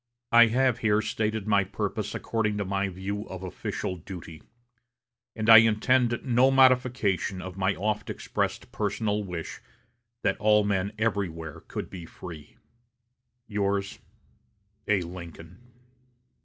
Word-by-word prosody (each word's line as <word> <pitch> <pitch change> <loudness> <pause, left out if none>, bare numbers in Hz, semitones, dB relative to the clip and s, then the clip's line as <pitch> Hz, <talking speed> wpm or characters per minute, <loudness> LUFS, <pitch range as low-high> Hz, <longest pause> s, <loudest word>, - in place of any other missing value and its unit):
"I 120 0 +8
have 125 +1 +2
here 105 -1 +2
stated 110 -1 -2
my 100 -2 +3
purpose - - -4
according 105 -2 -1
to 100 - -2
my 100 +1 -1
view 100 +3 -5
of 95 0 -7
official 90 0 -4
duty; 85 -2 -10 0.9
and 110 -1 -3
I 115 -1 +11
intend 120 +2 +3
no 125 0 +4
modification 125 -8 +3
of 95 -1 -7
my 95 0 0
oft 105 +2 -2
expressed - - -3
personal 105 0 -1
wish 90 -4 -6 0.6
that 95 - +1
all 105 0 +4
men 100 -1 0
everywhere 95 -8 -2
could - - -6
be 85 -3 -8
free. 80 -4 -11 0.9
"Yours, 100 -2 -2 0.9
"A. 100 -3 +2
LINCOLN." 85 0 -10
100 Hz, 125 wpm, -27 LUFS, 95-110 Hz, 0.9 s, I